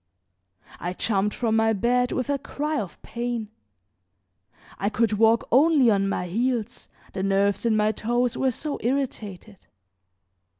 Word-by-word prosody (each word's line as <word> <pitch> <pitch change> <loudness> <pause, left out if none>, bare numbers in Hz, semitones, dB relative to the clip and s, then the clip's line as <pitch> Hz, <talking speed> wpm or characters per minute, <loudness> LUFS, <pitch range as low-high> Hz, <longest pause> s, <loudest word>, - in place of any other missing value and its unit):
I 175 +1 -3
jumped 205 +1 0
from 225 -2 0
my 225 0 +3
bed 245 +4 +1
with 255 - -2
a 280 - 0
cry 300 +2 -3
of 190 - -9
pain; 235 -2 -4 1.3
I 200 - 0
could 220 0 +1
walk 225 +2 +3
only 275 -2 +5
on 195 -1 +1
my 180 - -2
heels, 235 +4 -2 0.2
the 190 - -3
nerves 200 +3 +1
in 220 -1 +2
my 210 0 +3
toes 240 +2 -1
were 265 - +1
so 290 +4 -4
irritated. 220 -6 -4
225 Hz, 140 wpm, -25 LUFS, 205-250 Hz, 1.3 s, only